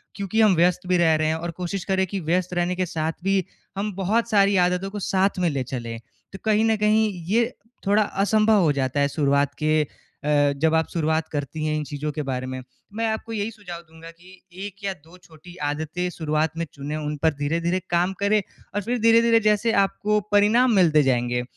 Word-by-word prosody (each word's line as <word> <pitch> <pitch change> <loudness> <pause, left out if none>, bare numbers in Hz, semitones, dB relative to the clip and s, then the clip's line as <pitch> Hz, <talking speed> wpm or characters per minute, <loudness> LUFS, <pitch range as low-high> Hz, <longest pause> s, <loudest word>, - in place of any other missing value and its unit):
क्योंकि 200 +2 0
हम 210 -4 +5
व्यस्त 180 +2 +2
भी 180 - +3
रह 165 -2 +4
रहे 155 0 0
हैं 160 - +1
और 170 +1 -4
कोशिश 180 +2 -4
करें 190 0 +1
कि 195 +2 -4
व्यस्त 180 +2 -1
रहने 175 +1 0
के 185 0 0
साथ 160 -1 -2
भी 195 -1 +2 0.3
हम 205 +1 -2
बहुत 210 +5 0
सारी 200 -2 +4
आदतों 180 +1 +1
को 205 - -5
साथ 190 +1 0
में 175 -2 +2
ले 140 -3 -2
चलें। 115 -3 -5 0.3
तो 195 - -8
कहीं 215 0 +3
न 225 0 +3
कहीं 215 0 +2 0.2
ये 235 +2 +2 0.3
थोड़ा 210 +2 +4
असंभव 210 +1 +2
हो 160 - +3
जाता 135 0 -1
है 140 - +3
शुरुआत 140 -1 +1
के 155 0 +3 0.4
अ, - - -4 0.3
जब 160 +1 +2
आप 160 0 +2
शुरुआत 160 -1 0
करती 150 +1 -4
हैं 155 0 0
इन 150 - -2
चीज़ों 150 +1 -4
के 150 - -4
बारे 130 -1 -2
में। 130 0 -5 0.3
मैं 225 +2 -1
आपको 220 +1 -3
यही 215 0 -2
सुझाव 185 -6 -9
दूँगा 160 +1 -12
कि 180 +2 -18 0.2
1 200 0 -10
या 195 -1 -1
2 165 +1 -18
छोटी 175 0 -16
आदतें 160 +4 -3
शुरुआत 160 -1 -1
में 170 - -1
चुने 145 +1 -5
उन 150 -1 -3
पर 160 - +4
धीरे-धीरे 165 +5 -1
काम 175 +2 +1
करें 205 +1 +3 0.3
और 205 - 0
फ़िर 240 +4 -2
धीरे-धीरे 230 0 +5
जैसे 215 +1 +2
आपको 210 +2 0
परिणाम 215 +5 +4
मिलते 160 -6 +5
जाएँगे, 125 -2 0
180 Hz, 210 wpm, -23 LUFS, 155-205 Hz, 0.4 s, हम